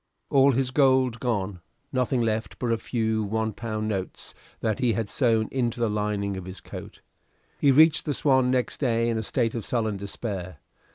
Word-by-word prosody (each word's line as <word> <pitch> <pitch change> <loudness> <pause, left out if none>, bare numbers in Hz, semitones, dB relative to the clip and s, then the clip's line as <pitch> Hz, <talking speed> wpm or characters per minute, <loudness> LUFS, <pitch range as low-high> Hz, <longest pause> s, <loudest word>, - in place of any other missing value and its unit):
All 135 0 +5
his 130 +1 0
gold 130 -4 +3
gone, 105 -6 -2 0.3
nothing 125 -1 +1
left 110 -2 -2
but 120 -2 -1
a 115 - +2
few 110 -1 -1
one 110 +1 -1
pound 110 -1 -3
notes 95 -3 -4 0.3
that 110 +2 -1
he 125 -3 +2
had 105 0 -3
sewed 115 -4 +2
into 120 -2 -1
the 115 -2 +1
lining 105 -1 -1
of 95 - -7
his 95 +1 -8
coat. - - -10 0.6
He 140 - +5
reached 155 +3 +5
the 145 -3 -1
"Swan" 130 -3 +3
next 125 -1 0
day 115 -4 +1
in 115 -1 0
a - - -1
state 115 +1 0
of 115 - -4
sullen 110 -3 -1
despair. 100 -4 -5
115 Hz, 185 wpm, -26 LUFS, 105-130 Hz, 0.6 s, All